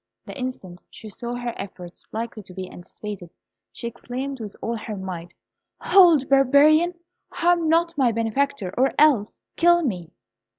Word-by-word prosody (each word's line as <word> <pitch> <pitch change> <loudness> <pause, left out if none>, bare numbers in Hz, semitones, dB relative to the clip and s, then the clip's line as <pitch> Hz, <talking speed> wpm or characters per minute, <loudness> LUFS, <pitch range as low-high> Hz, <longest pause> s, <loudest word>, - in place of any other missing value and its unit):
The - - -9
instant 250 -10 -6
she 220 - -10
saw 240 +4 -5
her 240 -1 -4
efforts 180 -3 -9
likely 225 0 -5
to 185 -2 -14
be 185 -1 -5
anticipated, 180 0 -9 0.4
she - - -9
exclaimed, 250 +3 -5
with 210 -3 -7
all 235 - -3
her 215 -1 -6
might, 175 -2 -7 0.4
"Hold, 340 -8 +5
barbarian! 290 +6 +5 0.3
Harm 340 -2 +1
not 335 +1 +2
my 250 -3 +4
benefactor, 230 -2 -1
or 265 +2 +2
else 275 -9 +3
kill 345 0 +4
me!" 180 - -3
240 Hz, 145 wpm, -23 LUFS, 200-285 Hz, 0.4 s, Hold